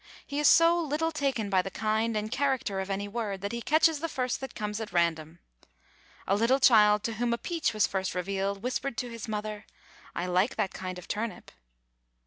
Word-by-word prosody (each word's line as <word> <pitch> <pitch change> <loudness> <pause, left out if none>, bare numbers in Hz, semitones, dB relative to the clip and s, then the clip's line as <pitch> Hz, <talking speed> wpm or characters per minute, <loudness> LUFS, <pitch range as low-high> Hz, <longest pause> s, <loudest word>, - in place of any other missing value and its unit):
He 285 0 -3
is 295 - +4
so 335 +1 +6
little 320 0 -1
taken 270 -9 -1
by 190 -1 +4
the 195 - -5
kind 220 +2 0
and 215 +1 -3
character 265 -7 0
of 190 +1 -4
any 200 +1 -2
word 205 -3 -4
that 200 - -3
he 235 0 -4
catches 315 +3 +3
the 330 +2 -3
first 255 -3 -2
that 265 - -7
comes 210 0 -3
at 220 - -6
random. 165 -2 0 0.9
A 195 - +2
little 230 +6 +3
child 210 -4 +6
to 230 - -2
whom 240 -1 +1
a - - 0
peach 335 +4 -1
was 215 -3 +2
first 190 -2 -2
revealed, 195 +2 -2
whispered 250 0 -2
to 245 -2 -3
his 230 0 -7
mother, 215 0 -4 0.5
"I 175 - -2
like 185 +6 +1
that 210 -4 -1
kind 185 -1 -5
of 180 - -10
turnip." 220 +2 -4
215 Hz, 205 wpm, -28 LUFS, 195-260 Hz, 0.9 s, so